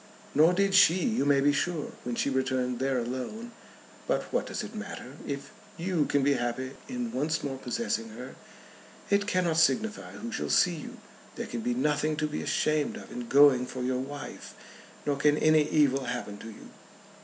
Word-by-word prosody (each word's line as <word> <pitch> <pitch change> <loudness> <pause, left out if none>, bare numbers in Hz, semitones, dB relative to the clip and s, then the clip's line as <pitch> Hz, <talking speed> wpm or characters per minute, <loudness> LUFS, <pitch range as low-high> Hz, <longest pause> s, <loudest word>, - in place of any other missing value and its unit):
"Nor 160 +4 +5
did 195 +1 +2
she, 185 -3 +7
you 220 - 0
may 140 -1 +4
be 145 +1 +4
sure, 165 0 -1
when 120 -1 -3
she 140 - 0
returned 130 -2 0
there 135 0 +1
alone. 130 - -4 0.6
But - - +1
what - - 0
does - - -4
it - - -8
matter? 145 - -7
If 140 -1 -5 0.3
you 170 -3 0
can 140 -1 +1
be 140 +1 +4
happy 125 +1 -2 0.2
in 245 -2 -3
once 155 +5 -1
more 135 -2 -4
possessing 135 - -2
her, 125 +4 -9 0.8
it 200 0 +3
cannot 175 -4 +1
signify 215 +7 +1
who 235 +2 -7
shall 220 - -3
see 180 -3 +4
you. 155 - -8 0.4
There - - -4
can 120 - -5
be 120 +1 -1
nothing 150 +3 +1
to 155 - -1
be 150 - -3
ashamed 155 -1 0
of - - -11
in 120 -1 -6
going 135 -3 +6
for 125 0 -5
your 125 0 0
wife; 140 +2 -7 0.5
nor 145 -1 0
can 150 +1 +3
any 155 -1 +4
evil 135 -3 +3
happen 105 -5 -4
to 115 - -9
you. 110 - -12
145 Hz, 190 wpm, -28 LUFS, 130-170 Hz, 0.8 s, she